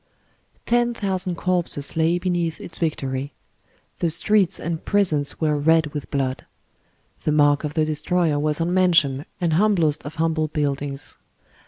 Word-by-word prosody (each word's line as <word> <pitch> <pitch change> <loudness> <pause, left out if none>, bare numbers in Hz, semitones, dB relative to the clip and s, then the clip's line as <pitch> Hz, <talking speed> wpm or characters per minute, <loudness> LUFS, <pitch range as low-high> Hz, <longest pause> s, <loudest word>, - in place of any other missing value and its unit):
Ten 240 0 +2
thousand 190 -4 -2
corpses 170 -5 -1
lay 165 +2 +2
beneath 175 -3 -1
its 170 - -6
Victory; 140 -4 -2 0.7
the 170 - +1
streets 195 +3 +1
and 165 -1 -4
prisons 160 -9 +1
were 155 -2 +1
red 155 0 +2
with 145 -2 -5
blood; 135 -2 -2 0.7
the 155 - 0
mark 145 -1 +3
of 150 0 -4
the 155 -1 +2
destroyer 155 0 0
was 150 +1 0
on 170 +2 0
mansion 165 -6 +3
and 170 -3 0
humblest 170 -5 +2
of 145 +2 -8
humble 160 -1 0
buildings. 145 -2 -3
160 Hz, 145 wpm, -22 LUFS, 145-175 Hz, 0.7 s, mark